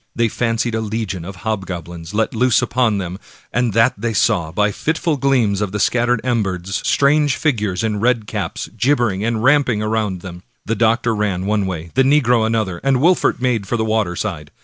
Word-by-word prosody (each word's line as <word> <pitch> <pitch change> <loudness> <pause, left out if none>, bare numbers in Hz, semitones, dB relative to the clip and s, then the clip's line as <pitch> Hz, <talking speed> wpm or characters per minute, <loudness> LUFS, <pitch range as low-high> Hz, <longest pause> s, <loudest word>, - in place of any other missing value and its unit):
They 115 -1 +1
fancied 115 +1 -1
a 110 - -1
legion 105 -5 -3
of 95 +2 -8
hobgoblins 85 -5 -4
let 110 0 0
loose 125 +1 +2
upon 120 -4 +1
them, 90 0 -5 0.3
and 125 -1 +1
that 115 +4 +4
they 115 +2 -3
saw, 95 -7 +1
by 105 +4 +1
the - - -6
fitful 160 - -1
gleams 125 -8 +1
of 100 -2 -2
the 105 - -2
scattered 120 +2 +2
embers, 95 -7 -1
strange 145 -1 +3
figures, 105 - -1
in 105 -2 -1
red 120 0 +1
caps, - - -4
gib 130 +6 +2
bering 105 -5 -1
and 115 0 -1
ramping 130 -5 +3
around 105 -4 -1
them. 90 -1 -9 0.2
The 115 - -1
doctor 115 +1 +2
ran 100 -4 -1
one 105 -1 0
way, 85 -2 -5
the 135 - +3
negro 125 -5 +3
another, 110 -6 -1
and 135 -1 +3
Wolfert 175 +6 +2
made 120 -5 0
for 120 - -1
the 110 - 0
water 110 -5 0
side. 85 -7 -4
110 Hz, 195 wpm, -19 LUFS, 95-120 Hz, 0.3 s, that